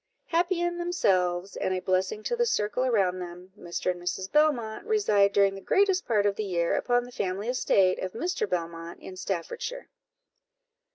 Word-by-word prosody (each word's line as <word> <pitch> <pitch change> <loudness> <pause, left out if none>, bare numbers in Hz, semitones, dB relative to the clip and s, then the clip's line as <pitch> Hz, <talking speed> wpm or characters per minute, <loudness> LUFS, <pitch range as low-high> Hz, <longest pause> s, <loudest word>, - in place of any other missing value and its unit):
Happy 345 +1 +1
in 345 0 -1
themselves, 190 - +1
and 185 - -1
a - - -1
blessing 185 +3 -1
to 480 - -1
the 475 - +2
circle 210 - 0
around 195 -8 +2
them, 180 +1 -9
Mr. 175 -2 -2
and 175 -1 -8
Mrs. 185 +2 -3
Belmont 265 -8 +2
reside 210 - +3
during 200 -1 +3
the 195 - -8
greatest 385 - +2
part 210 -3 +2
of 200 -1 +2
the 215 - -1
year 170 -4 0
upon 245 0 +1
the 245 - -11
family 195 -1 -3
estate 195 -7 +2
of 185 - -4
Mr. 345 - -2
Belmont 170 -1 -4
in 185 - -9
Staffordshire. 195 - -4
200 Hz, 175 wpm, -27 LUFS, 185-260 Hz, -, reside